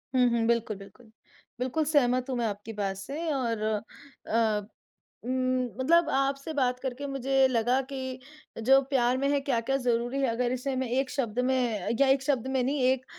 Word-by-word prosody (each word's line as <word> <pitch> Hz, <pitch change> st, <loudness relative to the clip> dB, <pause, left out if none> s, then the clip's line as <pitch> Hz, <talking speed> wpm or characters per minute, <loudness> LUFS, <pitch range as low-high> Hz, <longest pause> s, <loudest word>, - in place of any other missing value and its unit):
हुँ, 250 Hz, -1 st, +5 dB
हुँ। 235 Hz, -1 st, +1 dB
बिल्कुल, 230 Hz, -3 st, 0 dB
बिल्कुल। 200 Hz, +4 st, -15 dB, 0.5 s
बिल्कुल, 260 Hz, +5 st, 0 dB
सहमत 255 Hz, -4 st, +2 dB
हूँ 255 Hz, -, -1 dB
मैं 235 Hz, -, 0 dB
आपकी 205 Hz, +1 st, -4 dB
बात 200 Hz, -2 st, -2 dB
से 300 Hz, +11 st, -4 dB
और 235 Hz, -5 st, -1 dB, 0.7 s
अ, 215 Hz, -2 st, +1 dB, 0.6 s
उम, 255 Hz, 0 st, 0 dB, 0.2 s
मतलब 335 Hz, +5 st, +4 dB
आपसे 275 Hz, +3 st, 0 dB
बात 250 Hz, -3 st, +1 dB
करके 265 Hz, +2 st, -4 dB
मुझे 270 Hz, 0 st, +2 dB
लगा 245 Hz, +1 st, +2 dB
कि 260 Hz, -1 st, -4 dB, 0.4 s
जो 270 Hz, +3 st, +6 dB
प्यार 250 Hz, -2 st, +2 dB
में 275 Hz, +1 st, +1 dB
है, 285 Hz, -1 st, +2 dB
क्या-क्या 270 Hz, -1 st, 0 dB
ज़रूरी 245 Hz, +1 st, 0 dB
हैं। 270 Hz, -, +2 dB
अगर 240 Hz, +1 st, 0 dB
इसे 260 Hz, +2 st, -2 dB
मैं 260 Hz, -1 st, -1 dB
एक 260 Hz, +2 st, 0 dB
शब्द 245 Hz, -5 st, -2 dB
में 240 Hz, -7 st, 0 dB
या 275 Hz, -, +5 dB
एक 270 Hz, 0 st, +3 dB
शब्द 270 Hz, -4 st, 0 dB
में 265 Hz, -1 st, 0 dB
नहीं 275 Hz, +3 st, 0 dB
एक 260 Hz, -1 st, -1 dB
255 Hz, 180 wpm, -28 LUFS, 235-270 Hz, 0.7 s, जो